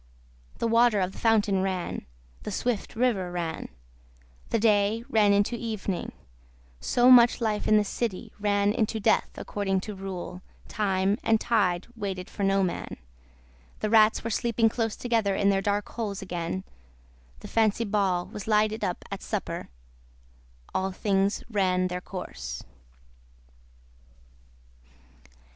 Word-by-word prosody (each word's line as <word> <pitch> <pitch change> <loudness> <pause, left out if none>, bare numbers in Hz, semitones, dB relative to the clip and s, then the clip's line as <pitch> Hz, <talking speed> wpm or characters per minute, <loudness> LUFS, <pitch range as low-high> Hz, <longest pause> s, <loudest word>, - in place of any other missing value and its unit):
The 230 - 0
water 230 -2 +4
of 185 0 0
the - - -11
fountain 210 -4 +3
ran, 185 - -3 0.3
the - - -5
swift 230 +1 -2
river 220 -7 +1
ran, 170 -2 -4 0.8
the - - +2
day 210 0 +2
ran 215 -4 +4
into 205 +4 +2
evening, 215 -5 -3 0.7
so 245 +1 +4
much 240 -1 +7
life 215 -3 -1
in 215 - +5
the 210 - +4
city 205 -1 -4
ran 205 0 +2
into 220 -1 0
death 220 +1 +2
according 195 -2 -1
to 210 - -6
rule, 190 -2 -6 0.3
time 195 0 0
and 225 -1 +3
tide 195 -7 +1
waited 195 -4 -5
for - - -7
no 195 0 +3
man, 180 - -3 0.8
the 215 - -1
rats 220 -1 +5
were 230 - -3
sleeping 230 +1 +2
close 225 -1 -2
together 225 -5 0
in 200 +1 +3
their 195 0 +1
dark 205 +1 0
holes 210 -4 -4
again, 180 0 -3 0.8
the - - -8
Fancy 225 0 +2
Ball 195 -4 +1
was 210 - -8
lighted 215 0 +2
up 180 - -3
at - - -5
supper, - - -4 1.0
all 190 0 0
things 195 +1 0
ran 185 -4 +1
their 180 0 -4
course. 65 - -7
205 Hz, 135 wpm, -27 LUFS, 190-225 Hz, 1.0 s, much